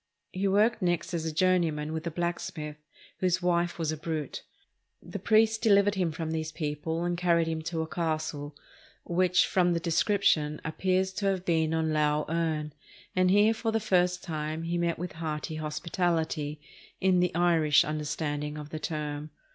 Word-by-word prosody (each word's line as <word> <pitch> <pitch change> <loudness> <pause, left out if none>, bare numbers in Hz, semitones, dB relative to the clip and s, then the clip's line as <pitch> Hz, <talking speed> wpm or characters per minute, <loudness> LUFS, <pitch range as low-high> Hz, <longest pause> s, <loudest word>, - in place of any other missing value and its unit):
He 195 +2 -1
worked 210 +4 +3
next 175 -1 0
as 165 -2 -2
a 160 - -1
journeyman 160 -3 +1
with 160 +1 -4
a - - +1
blacksmith, 165 -2 -4 0.4
whose 185 -1 +2
wife 175 -1 +1
was 160 -2 -1
a 155 - -4
brute. 155 -2 -4 0.6
The - - -7
priest 220 0 +3
deliv 200 -3 +6
ered 205 - +2
him 180 -4 0
from 160 0 -4
these 160 -1 -2
people, 155 +1 -3
and 175 0 0
carried 170 -1 +2
him 160 -1 -2
to 160 0 -2
a - - -6
castle, 155 -3 -3 0.5
which, 180 +1 +3
from 180 -2 +2
the 170 - 0
description, 165 -3 +2
appears 185 +3 0
to 200 +1 -1
have 190 -2 0
been 160 -3 +2
on 160 -1 0
Lough 150 0 +2
Erne, 160 -2 -1 0.4
and 185 0 +3
here 205 +3 +5
for 225 0 -2
the 225 - +1
first 180 -4 +1
time 155 -1 -3
he 170 +1 -2
met 170 -1 0
with 180 +1 -5
513 155 0 -4
SPAIN - - -5
hearty - - -5
hospitality, 160 -2 -1 0.4
in 185 -1 +3
the 180 -2 +1
Irish 165 -4 +4
understanding 150 0 -3
of 150 -1 -7
the 155 - -4
term. 150 -2 -4
165 Hz, 180 wpm, -29 LUFS, 155-180 Hz, 0.6 s, deliv